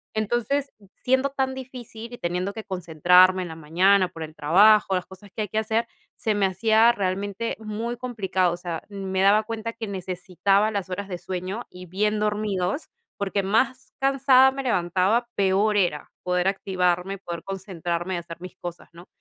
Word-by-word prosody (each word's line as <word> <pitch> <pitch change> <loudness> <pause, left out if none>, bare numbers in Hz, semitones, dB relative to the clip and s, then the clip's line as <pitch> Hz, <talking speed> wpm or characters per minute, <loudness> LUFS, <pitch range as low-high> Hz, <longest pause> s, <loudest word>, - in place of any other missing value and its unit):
Entonces, 240 +6 -1 0.3
siendo 260 +2 +2
tan 265 -1 -1
difícil 245 -3 -9
y 240 - -7
teniendo 180 +3 -2
que 220 +1 -7
concentrarme 180 +1 +4
en - - -6
la 160 - -8
mañana 185 +5 +3
por 165 -2 -8
el 155 0 -8
trabajo, 195 +6 +5
las 180 - -2
cosas 190 +2 -14
que 215 - -1
hay - - -4
que 215 - 0
hacer, 220 +1 0 0.3
se 220 - -1
me 205 -2 +2
hacía 220 +4 +4
realmente 200 +1 -2
muy 220 +2 -4
complicado, 200 -7 -1
o - - -5
sea, 175 -2 -5
me 190 -2 -3
daba 205 +2 +5
cuenta 225 0 -4
que 230 -1 -6
necesitaba 195 +2 0
las 200 -3 -3
horas 195 +2 -4
de 180 -2 -5
sueño 185 +5 -5
y 180 0 -11
bien 210 +4 0
dormidos 210 - -1 0.3
porque 200 0 -1
más 240 +6 0
cansada 270 -1 +5
me 270 0 -5
levantaba, 195 +2 +1
peor 200 +2 +2
era, 175 -6 0
poder 180 0 +1
activarme, 190 -1 0
poder 170 -3 -7
concentrarme 185 -2 -4
y - - -2
hacer 170 -1 -8
mis 180 0 -9
cosas, 175 -1 -8
¿no? 175 +2 -14
195 Hz, 175 wpm, -24 LUFS, 180-220 Hz, 0.3 s, trabajo